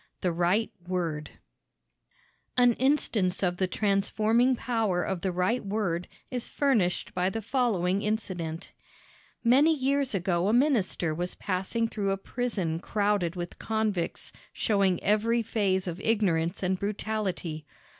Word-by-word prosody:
THE 180 - +1
RIGHT 175 +6 +1 0.2
WORD 165 -5 -2 1.3
An 245 -1 +6
instance 225 -9 +1
of 175 -1 +1
the 185 - +1
transforming 215 +6 +2
power 220 -8 0
of 190 -3 -3
the 190 - 0
right 185 +8 0
word 195 -4 -1 0.2
is 250 -2 -3
furnished 225 -11 +1
by 180 +1 +1
the 225 - -3
following 205 -5 +1
incident: 185 -6 -3 0.7
Many 280 +7 +5
years 275 -3 0
ago 180 -1 +1
a 210 - +2
minister 230 - +2
was 175 +3 -3
passing 195 +4 -1
through 205 -3 -2
a 195 - +1
prison 195 -7 -2
crowded 200 -3 0
with 175 0 -6
convicts 215 -6 -1 0.2
showing 195 -5 +1
every 225 +3 +2
phase 195 -4 0
of 175 +2 -4
ignorance 190 -6 +1
and 185 0 0
brutality. 200 -7 -3
200 Hz, 130 wpm, -28 LUFS, 180-225 Hz, 1.3 s, An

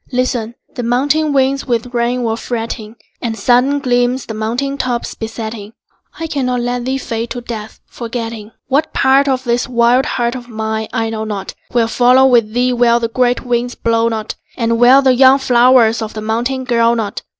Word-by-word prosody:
Listen: 245 -2 -1 0.2
the - - -4
mountain 285 +6 +1
winds 275 0 +1
with 240 0 -2
rain 240 +1 0
were 225 -1 0
fretting, 225 -1 -5 0.3
And 225 -2 -3
sudden 250 +6 +2
gleams 245 -1 0
the 220 - -6
mountain 245 +6 -3
tops 245 -2 -2
besetting. 220 -1 -7 0.5
I 330 - -3
cannot 255 -5 -1
let 245 0 -2
thee 265 +1 -1
fade 230 -3 -4
to 245 - -5
death, 220 -2 -7
forgetting. 230 -2 -6 0.2
What 290 +4 0
part 270 +2 +3
of 260 -1 0
this 240 0 0
wild 245 +3 +3
heart 240 -1 -1
of 245 -1 -8
mine 220 -1 -3
I 225 -2 -2
know 220 -1 -3
not 200 -3 -5 0.2
Will 235 -2 +2
follow 250 +3 +4
with 235 -5 +3
thee 250 +2 +1
where 240 -1 +3
the 230 -1 -2
great 250 +1 0
winds 245 0 -1
blow 230 0 +1
not, 220 -1 -4 0.2
And 230 -1 0
where 255 +3 +6
the 260 -1 +4
young 260 +1 +6
flowers 245 -3 +4
of 220 0 -5
the 215 - -4
mountain 240 +5 -2
grow 235 -2 +2
not. 220 -3 -3
240 Hz, 185 wpm, -16 LUFS, 225-255 Hz, 0.5 s, where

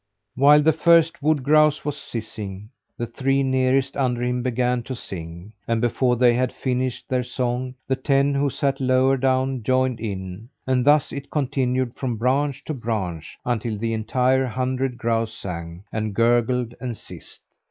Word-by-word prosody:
While 145 +3 +6
the 160 +1 +4
first 165 0 +4
wood 150 -2 +1
grouse 155 +1 +4
was 145 -1 -2
sissing, 110 -6 -7 0.3
the 120 - -2
three 135 +4 0
nearest 130 +1 +1
under 125 -3 0
him 125 0 0
began 125 0 0
to 130 +2 -6
sing; 85 -1 -8
and 115 -1 +1
before 125 +1 +1
they 120 0 +4
had 125 +1 0
finished 130 -1 -2
their 130 -1 0
song, 125 +1 -3
the 130 - +1
ten 140 +1 +2
who 140 0 +1
sat 135 0 -1
lower 130 +1 +3
down 130 0 0
joined 130 +1 +1
in; 100 0 -6 0.2
and 130 -1 +1
thus 145 0 +4
it 140 0 -6
continued 130 -3 0
from 125 -4 -3
branch 135 +4 0
to 155 - -4
branch, 100 - -4
until 115 -2 -1
the 115 +2 -2
entire 125 +4 +1
hundred 130 +1 -2
grouse 115 -1 -1
sang 85 -2 -7
and 110 -2 -2
gurgled 120 +1 +2
and 125 -4 -4
sissed. - - -12
125 Hz, 165 wpm, -23 LUFS, 115-135 Hz, 0.3 s, While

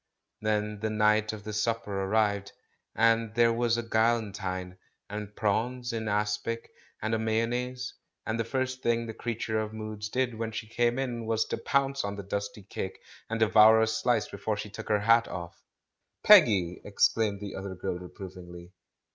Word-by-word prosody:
Then 105 -1 -1
the 110 +1 -1
night 105 0 +3
of 110 -1 -8
the 105 0 -6
supper 110 -1 -1
arrived, 100 -1 +1 0.4
and 115 -1 +3
there 115 0 +4
were 120 +1 0
a 115 0 +1
galantine, 100 -5 -1 0.3
and 105 0 -6
prawns 120 +4 -1
in 110 -1 -3
aspic, 105 +2 -1 0.3
and 110 +1 0
a 110 - +1
mayonnaise; 120 +3 -1 0.3
and 110 +1 -2
the - - +2
first 130 +2 -2
thing 115 0 +1
the 110 - -6
creature 115 -1 -2
of 110 0 -3
moods 110 -1 -5
did 125 +1 0
when 115 0 -4
she 110 - -5
came 120 +2 +1
in 120 -4 -3
was 110 0 +1
to - - -3
pounce 140 0 +1
on 100 0 -3
the 100 - -6
dusty 100 +1 -4
cake 95 0 -5 0.3
and 115 0 -2
devour 110 +1 +7
a 110 - +4
slice 110 0 +1
before 105 +1 -3
she 105 0 -6
took - - -8
her 105 -1 +2
hat 115 +2 +4
off. 85 -2 -7 0.6
"Peggy!" 105 - +6
exclaimed 105 0 +1
the 100 -1 -6
other 95 0 -6
girl 90 0 -3
reprovingly. 90 -1 -10
110 Hz, 170 wpm, -29 LUFS, 105-115 Hz, 0.6 s, devour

